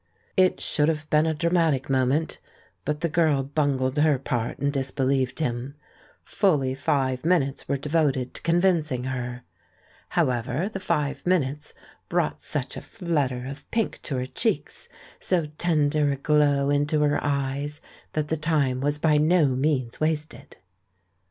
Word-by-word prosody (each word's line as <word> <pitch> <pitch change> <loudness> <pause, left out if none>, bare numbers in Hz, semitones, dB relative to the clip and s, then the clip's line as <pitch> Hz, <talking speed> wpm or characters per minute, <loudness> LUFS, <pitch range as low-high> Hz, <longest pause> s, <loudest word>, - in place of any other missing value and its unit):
It 185 -1 +3
should 150 +1 +1
have 155 -1 -2
been 155 +1 +4
a 160 - +1
dramatic 160 -4 +1
moment, 135 +4 +1 0.5
but 150 0 -2
the 170 - +1
girl 155 -4 +2
bungled 140 -1 0
her 150 -2 +4
part 120 -3 -2
and 140 0 -1
disbelieved 135 -1 0
him. 130 -1 -2 0.5
Fully 150 -10 +1
five 135 -2 0
minutes 155 -5 +1
were 140 - +1
devoted 140 -3 0
to - - -6
convincing 165 -7 +1
her. 125 -1 -4 0.7
However, 125 - 0
the 195 - -3
five 140 -5 -1
minutes 150 -5 0 0.3
brought 75 0 0
such 140 - -3
a - - -6
flutter 145 - -2
of 140 +2 -9
pink 225 -2 -1
to 140 - -3
her 125 - -1
cheeks, - - -2 0.3
so 175 -4 0
tender 150 -3 +2
a - - 0
glow 145 -1 +2
into 145 +1 +1
her 145 -1 +2
eyes, 140 +1 -2 0.3
that 150 -1 -1
the 160 - 0
time 145 -5 +1
was 145 +1 0
by 150 0 +3
no 160 +2 +4
means 130 -2 0
wasted. 155 -3 -3
145 Hz, 145 wpm, -25 LUFS, 130-155 Hz, 0.7 s, been